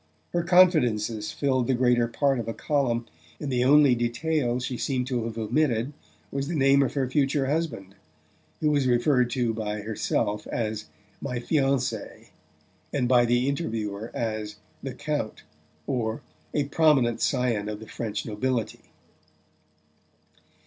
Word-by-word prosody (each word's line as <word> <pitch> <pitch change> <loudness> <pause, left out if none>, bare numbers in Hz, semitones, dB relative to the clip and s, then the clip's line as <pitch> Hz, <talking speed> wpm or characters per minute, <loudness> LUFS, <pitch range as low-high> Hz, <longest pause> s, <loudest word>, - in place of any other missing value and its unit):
Her 175 - +2
confidences 120 - +3
filled 130 -4 0
the 130 - +2
greater 120 -1 +3
part 135 +2 +1
of 115 - -4
a 115 - -3
column, 125 -6 0 0.3
and 145 - -4
the 125 -1 +2
only 140 0 +6
detail 120 +2 0
she 125 0 -3
seemed 125 0 -1
to 125 -3 -2
have 115 -1 -5
omitted 120 +2 0 0.4
was 140 0 -2
the 170 - -2
name 135 -1 +5
of 135 - 0
her 135 -2 +1
future 135 +1 +1
husband, 140 - -2 0.7
who 150 -1 +3
was 140 -3 +2
referred 125 0 +3
to 120 -2 0
by 105 -1 -3
herself 105 0 -1
as 110 -2 -3 0.3
"my 125 -3 -3
fiancé" 135 0 -1 0.6
and 130 -4 0
by 120 -1 +5
the 120 +2 +2
interviewer 110 -7 -3
as 110 -2 -3 0.3
"the 135 -2 -5
Count" 145 -6 -3 0.4
or 115 -4 -2 0.3
"a 145 - +1
prominent 140 -5 +3
scion 120 -6 0
of 105 -1 -5
the 110 - -10
French 110 -3 -4
nobility." 115 +2 -2
125 Hz, 140 wpm, -26 LUFS, 115-140 Hz, 0.7 s, only